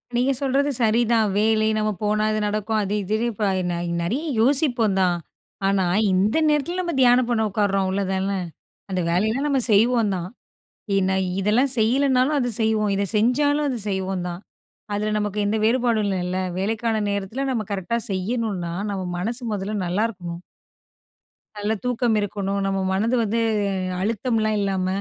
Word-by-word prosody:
நீங்க 250 +3 +2
சொல்றது 275 +1 +1
சரிதான். 225 0 +3
வேலை 220 0 +2
நம்ம 215 0 0
போனா 210 +1 +1
இது 215 - 0
நடக்கும், 215 +1 -1
அது 200 +1 -3
இதுன்னு 215 +5 -1
இப்ப 205 -1 -1 0.2
ந 175 - -2 0.3
நறையா 250 - -2 0.2
யோசிப்போம் 245 -6 +3
தான். 180 -1 +2 0.5
ஆனா, 195 -1 +2 0.3
இந்த 200 +9 +2
நேரத்ல 300 +5 0
நம்ம 345 -1 -3
தியானம் 245 0 +5
பண்ண 230 -2 +1
உட்காருறோம் 195 -1 +1
அவ்ளோதான? 190 0 -1 0.6
அந்த 185 -1 -1
வேலையெல்லாம் 220 +11 +1
நம்ம 280 -2 +2
செய்வோம் 220 0 +3
தான். 180 0 -4 0.7
ஏன்னா 190 -1 +2 0.2
இதெல்லாம் 225 +8 +2
செய்யலனாலும் 260 +5 +2
அத 245 -2 0
செய்வோம், 215 -1 +1
இத 200 - 0
செஞ்சாலும் 290 +7 +2
அது 250 - -2
செய்வோம் 190 -1 -2
தான். 175 0 -6 0.5
அதுல 210 +1 -1
நமக்கு 210 0 -3
எந்த 210 +2 0
வேறுபாடும் 230 -2 +2
இல்லல்ல? 185 -1 -2 0.2
வேலைக்கான 220 +2 -1
நேரத்ல 200 +7 -3
நம்ம 230 -4 -1
கரெக்ட்டா 200 +4 -1
செய்யணுன்னா? 195 -2 -2 0.2
நம்ம 195 -2 -3 0.2
மனசு 230 +7 -3
மொதல்ல 205 +1 -3
நல்லாருக்கணும். 180 -3 -2 1.2
நல்ல 205 +1 -1
தூக்கம் 245 -2 +1
இருக்கணும், 200 -1 -2
நம்ம 195 0 0
மனது 220 +6 +1
வந்து 225 +2 0 0.6
அழுத்தம்லாம் 215 +1 0
இல்லாம, 190 -2 -1
215 Hz, 145 wpm, -23 LUFS, 195-240 Hz, 1.2 s, தியானம்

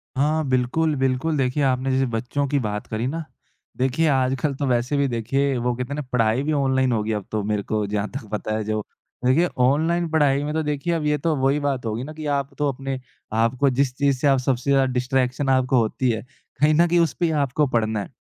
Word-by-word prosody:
हाँ, 150 +3 +1
बिल्कुल, 135 +5 +1
बिल्कुल 135 +4 0
देखिए 135 +2 0
आपने 130 0 +1
जैसे 135 +1 +2
बच्चों 130 +5 -1
की 140 0 +1
बात 105 -2 -3
करी 115 +3 -2
ना, 160 +4 -3 0.5
देखिए 130 +5 +1
आजकल 135 +1 +1
तो 140 - -2
वैसे 125 +3 +1
भी 140 - +2
देखिए 135 +3 0
वो 125 0 0
कहते 125 +3 -4
है - - -3
ना 150 - -3
पढ़ाई 115 +1 +2
भी 155 - -1
ऑनलाइन 130 -2 +2
हो 115 -2 +1
गई 110 - -2
अब 105 -3 -3
तो 110 -1 -1
मेरे 105 0 -1
को 105 0 -1
जहाँ 105 0 -1
तक 130 -3 -6
पता 110 0 -2
है 110 - -2
जो। 110 0 -1 0.4
देखिए 155 +8 +4
ऑनलाइन 160 +7 +2
पढ़ाई 145 -3 +2
में 150 +1 -3
तो 160 - 0
देखिए 150 +3 -1
अब 160 -2 -1
ये 150 0 +2
तो 155 +2 0
वही 135 +2 +1
बात 135 -4 -2
होगी 110 +2 -2
ना 155 +3 -7
कि 155 0 -8
आप 140 0 -5
तो 145 - +1
अपने 135 0 -5 0.3
आप 115 +2 +2
को 140 - +4
जिस 130 0 +1
चीज़ 140 -2 +2
से 140 - +1
आप 135 -1 +4
सबसे 130 +1 -1
ज़्यादा 135 -1 +4
डिस्ट्रैक्शन 130 +2 0
आपको 130 0 +3
होती 120 +2 +1
है 110 -1 -1 0.4
कहीं 155 +1 +5
न 170 +3 +4
कहीं 175 +1 +3
उस 165 -6 +2
पे 175 - -1
ही 165 - +1
आपको 140 +3 +1
पढ़ना 110 -4 0
है। - - -6
130 Hz, 240 wpm, -23 LUFS, 125-145 Hz, 0.5 s, कहीं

